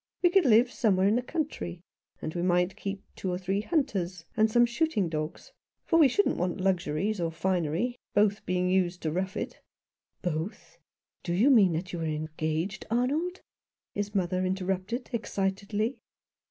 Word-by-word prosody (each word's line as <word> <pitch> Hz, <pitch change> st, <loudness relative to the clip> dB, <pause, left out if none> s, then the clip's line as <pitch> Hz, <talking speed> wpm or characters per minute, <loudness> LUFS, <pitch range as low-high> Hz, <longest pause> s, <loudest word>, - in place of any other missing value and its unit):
we 355 Hz, -, +5 dB
could 380 Hz, -3 st, +4 dB
live 240 Hz, +1 st, +5 dB
some 215 Hz, -5 st, +2 dB
where 190 Hz, +1 st, +3 dB
in 210 Hz, -, +3 dB
the 245 Hz, -, +2 dB
country 250 Hz, -, -4 dB, 0.2 s
— -, -, -42 dB
and 155 Hz, -, -3 dB
we 175 Hz, -, -2 dB
might 180 Hz, +1 st, +2 dB
keep 195 Hz, -1 st, -5 dB
two 190 Hz, -, -3 dB
or 180 Hz, -, -1 dB
three 195 Hz, +2 st, -1 dB
hunters, 195 Hz, -, -1 dB
and 220 Hz, 0 st, +4 dB
some 240 Hz, +2 st, +5 dB
shooting 240 Hz, -, 0 dB
dogs; 155 Hz, -, -4 dB, 0.3 s
for 330 Hz, -, +3 dB
we 305 Hz, -, +8 dB
shouldn't 405 Hz, +11 st, +2 dB
want 180 Hz, +2 st, -1 dB
luxuries 185 Hz, +1 st, 0 dB
or 165 Hz, -1 st, 0 dB
finery, 180 Hz, +6 st, 0 dB, 0.2 s
both 205 Hz, 0 st, +3 dB
being 180 Hz, 0 st, +1 dB
used 180 Hz, -1 st, +1 dB
to 155 Hz, -, 0 dB
rough 185 Hz, +3 st, -2 dB
it" -, -, -5 dB, 0.3 s
" -, -, -57 dB
Both 175 Hz, +3 st, -4 dB, 0.2 s
' -, -, -54 dB
Do 170 Hz, -, -1 dB
you 240 Hz, +10 st, +5 dB
mean 200 Hz, -9 st, +6 dB
that 180 Hz, +3 st, -4 dB
you 175 Hz, -, -3 dB
are -, -, -2 dB
engaged, 155 Hz, +3 st, -2 dB
Arnold? 290 Hz, +11 st, 0 dB, 0.3 s
" -, -, -65 dB
his 205 Hz, 0 st, -3 dB
mother 185 Hz, -1 st, +1 dB
interrupted 190 Hz, +5 st, -2 dB
excitedly. 205 Hz, +2 st, -1 dB
190 Hz, 180 wpm, -29 LUFS, 175-230 Hz, 0.3 s, we